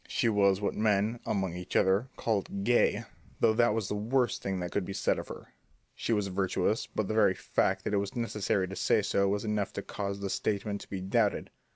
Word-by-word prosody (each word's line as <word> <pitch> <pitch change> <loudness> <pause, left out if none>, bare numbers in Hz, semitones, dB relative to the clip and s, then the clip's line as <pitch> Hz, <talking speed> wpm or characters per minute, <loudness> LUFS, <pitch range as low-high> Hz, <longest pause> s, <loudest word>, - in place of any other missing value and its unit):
She 115 - +1
was 100 -3 +3
what 100 - -1
men, 110 +2 +1
among 95 -4 -1
each 90 0 -7
other, 95 +7 +3
called 100 -3 -1
"gay," 120 +3 +3 0.4
though 110 - +4
that 120 -1 +3
was 110 -4 -1
the - - -2
worst 120 +3 0
that 90 -3 -3
could 100 - 0
be 95 - -5
said - - +1
of - - -7
her. - - -10 0.4
She - - -3
was 105 -3 +2
virtuous, 95 +2 0
but 110 - -2
the 110 - -2
very 110 -4 +4
fact 95 0 0
that - - -2
it - - +3
was 100 0 -2
necessary 105 -5 0
to 95 - -7
say 100 - +2
so 100 0 +2
was 100 +2 -1
enough 105 -2 -1
to 100 - -4
cause 100 -1 -4
the 100 -1 -3
statement 100 -1 -2
to - - -12
be 95 -2 -4
doubted. 100 +2 0
100 Hz, 220 wpm, -30 LUFS, 95-110 Hz, 0.4 s, though